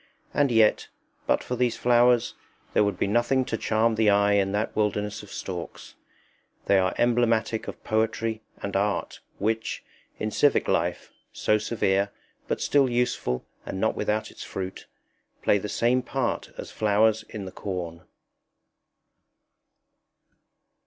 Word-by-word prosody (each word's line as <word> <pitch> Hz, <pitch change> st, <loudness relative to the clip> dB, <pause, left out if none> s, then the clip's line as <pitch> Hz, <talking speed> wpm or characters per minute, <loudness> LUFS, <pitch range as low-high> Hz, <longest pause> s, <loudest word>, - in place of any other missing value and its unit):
And 145 Hz, -3 st, +2 dB
yet, 110 Hz, -2 st, +4 dB, 0.4 s
but -, -, +2 dB
for 125 Hz, -, -3 dB
these 125 Hz, -1 st, 0 dB
flowers, 120 Hz, 0 st, +4 dB, 0.4 s
there -, -, +4 dB
would 100 Hz, -3 st, -1 dB
be -, -, +1 dB
nothing 120 Hz, +5 st, +2 dB
to 115 Hz, -, -2 dB
charm 110 Hz, +1 st, +1 dB
the 110 Hz, -1 st, +3 dB
eye 100 Hz, 0 st, +4 dB
in 100 Hz, -1 st, +2 dB
that 105 Hz, +2 st, -1 dB
wilderness 105 Hz, -1 st, -1 dB
of 105 Hz, -, -13 dB
stalks. 90 Hz, -3 st, -7 dB, 0.7 s
They 100 Hz, -, +4 dB
are 95 Hz, 0 st, +1 dB
emblematic 115 Hz, -2 st, +1 dB
of -, -, -8 dB
poetry 110 Hz, 0 st, 0 dB, 0.2 s
and 100 Hz, -1 st, -3 dB
art, 100 Hz, +1 st, -1 dB, 0.2 s
which, 110 Hz, +2 st, -2 dB, 0.3 s
in 110 Hz, -, -2 dB
civic 145 Hz, +6 st, +3 dB
life -, -, -1 dB, 0.2 s
so 105 Hz, 0 st, +1 dB
severe, 100 Hz, -3 st, +1 dB, 0.4 s
but -, -, -2 dB
still 140 Hz, -3 st, +3 dB
useful 120 Hz, -, -1 dB, 0.2 s
and 95 Hz, -, -5 dB
not 110 Hz, -, +2 dB
without 105 Hz, +1 st, -1 dB
its -, -, -9 dB
fruit 95 Hz, -1 st, -6 dB, 0.6 s
play 100 Hz, -, +4 dB
the 105 Hz, -, -5 dB
same 120 Hz, +5 st, +2 dB
part 125 Hz, -1 st, -2 dB
as -, -, -7 dB
flowers 110 Hz, +1 st, +2 dB
in 105 Hz, -3 st, -6 dB
the 95 Hz, -, -7 dB
corn. 90 Hz, -4 st, -5 dB
110 Hz, 140 wpm, -26 LUFS, 100-120 Hz, 0.7 s, yet